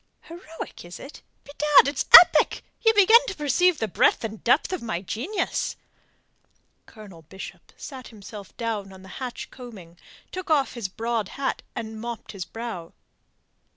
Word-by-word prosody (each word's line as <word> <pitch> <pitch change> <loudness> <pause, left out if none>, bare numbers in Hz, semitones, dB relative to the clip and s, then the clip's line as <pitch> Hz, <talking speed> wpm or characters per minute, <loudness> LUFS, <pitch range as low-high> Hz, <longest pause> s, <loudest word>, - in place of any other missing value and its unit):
"Heroic, 330 -1 -10
is 175 0 -10
it? 275 - -11 0.2
Bedad, 295 -1 +4
it's 280 -1 -2
epic! 350 - +2 0.2
Ye 450 - +6
begin 435 +2 +7
to 390 - -4
perceive 310 +4 +2
the 220 - -2
breadth 185 - +2
and 220 -1 -6
depth 270 +9 +2
of 370 - -3
my 215 -6 -4
genius." 270 - -3 1.1
Colonel 205 -7 -13
Bishop 190 +5 -11
sat 260 -3 -9
himself 210 -2 -12
down 215 -4 -4
on 190 0 -14
the 190 - -13
hatch 250 -2 -6
coaming, 195 -10 -12 0.3
took 370 -1 -7
off 290 -4 +2
his 235 -5 -4
broad 225 +1 -3
hat, 275 -1 -2
and 220 -1 -6
mopped 235 -1 -7
his 190 -4 -6
brow. 225 -8 -7
235 Hz, 155 wpm, -24 LUFS, 200-295 Hz, 1.1 s, begin